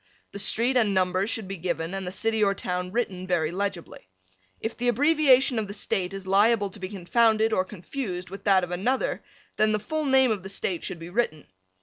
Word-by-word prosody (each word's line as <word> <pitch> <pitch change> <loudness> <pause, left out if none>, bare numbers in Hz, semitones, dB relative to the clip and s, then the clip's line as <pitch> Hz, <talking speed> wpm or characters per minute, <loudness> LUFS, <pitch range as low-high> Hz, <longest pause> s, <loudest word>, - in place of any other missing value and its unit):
The 200 - -7
street 235 +5 +1
and 210 -5 +2
numbers 185 +2 +1
should 220 -4 -2
be 195 0 -5
given 170 0 -3
and 195 -1 -4
the - - -3
city 220 +2 0
or 200 -1 +2
town 180 -1 -3
written 190 -5 -2
very 170 -3 +1
legibly. 185 - -4 0.5
If 225 - -4
the 245 - -2
abbreviation 270 -1 +4
of 215 - -3
the 200 - -7
State 190 -2 -1
is 195 -1 -7
liable 205 +1 +3
to 205 - -12
be 185 -1 -5
confounded 220 +3 +2
or 185 - +2
confused 185 -1 -6
with 195 - -8
that 195 -2 +4
of 180 - -4
another 230 +10 -1 0.3
then 215 0 +3
the 215 - +1
full 310 +9 -3
name 265 -2 +4
of 210 -3 -1
the 190 - -8
State 190 -3 -2
should 180 - -4
be 165 +1 -9
written. 180 -8 -1
200 Hz, 215 wpm, -26 LUFS, 185-230 Hz, 0.5 s, abbreviation